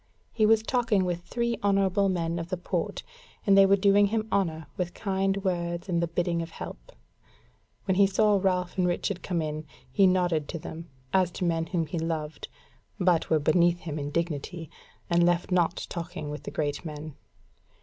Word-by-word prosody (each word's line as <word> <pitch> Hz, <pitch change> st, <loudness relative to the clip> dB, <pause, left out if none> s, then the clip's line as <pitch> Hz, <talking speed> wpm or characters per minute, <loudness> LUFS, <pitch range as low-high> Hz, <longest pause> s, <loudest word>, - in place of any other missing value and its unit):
He 215 Hz, -2 st, +3 dB
was 220 Hz, 0 st, +4 dB
talking 225 Hz, -6 st, +1 dB
with 175 Hz, -1 st, -2 dB
three 235 Hz, +4 st, -2 dB
honourable 195 Hz, -1 st, +3 dB
men 170 Hz, -2 st, -1 dB
of 165 Hz, 0 st, -6 dB
the 185 Hz, -, -2 dB
Port, 175 Hz, -, -3 dB, 0.4 s
and 200 Hz, -, +5 dB
they 195 Hz, 0 st, +7 dB
were 195 Hz, -, +6 dB
doing 200 Hz, +1 st, +4 dB
him 220 Hz, +1 st, -1 dB
honour 165 Hz, -5 st, 0 dB
with 175 Hz, -1 st, -3 dB
kind 195 Hz, -1 st, 0 dB
words 175 Hz, -2 st, -2 dB
and 170 Hz, -2 st, 0 dB
the 170 Hz, -, +1 dB
bidding 170 Hz, 0 st, -1 dB
of 165 Hz, -, -5 dB
help. -, -, -9 dB, 0.9 s
When 190 Hz, -, +2 dB
he 195 Hz, +1 st, +5 dB
saw 205 Hz, +1 st, +3 dB
Ralph 185 Hz, -1 st, 0 dB
and 180 Hz, -, +3 dB
Richard 180 Hz, +1 st, -1 dB
come 170 Hz, -4 st, -1 dB
in, 155 Hz, 0 st, -4 dB, 0.3 s
he 195 Hz, -2 st, +5 dB
nodded 175 Hz, -5 st, +1 dB
to -, -, -4 dB
them, 165 Hz, +1 st, -8 dB, 0.2 s
as 185 Hz, -2 st, +4 dB
to 180 Hz, -, -2 dB
men 165 Hz, -1 st, 0 dB
whom 170 Hz, -4 st, -1 dB
he 160 Hz, +2 st, -4 dB
loved, 160 Hz, -2 st, -3 dB, 0.5 s
but 180 Hz, -3 st, +2 dB
were 160 Hz, -, +4 dB
beneath 170 Hz, +3 st, +3 dB
him 155 Hz, -2 st, -4 dB
in 145 Hz, 0 st, -3 dB
dignity, 165 Hz, +1 st, -3 dB, 0.4 s
and 170 Hz, 0 st, +3 dB
left 175 Hz, +1 st, +1 dB
not 175 Hz, -1 st, +1 dB
talking 165 Hz, -3 st, -5 dB
with 150 Hz, -, -6 dB
the -, -, -3 dB
great 145 Hz, 0 st, -2 dB
men. 155 Hz, -1 st, -7 dB
175 Hz, 190 wpm, -27 LUFS, 165-195 Hz, 0.9 s, they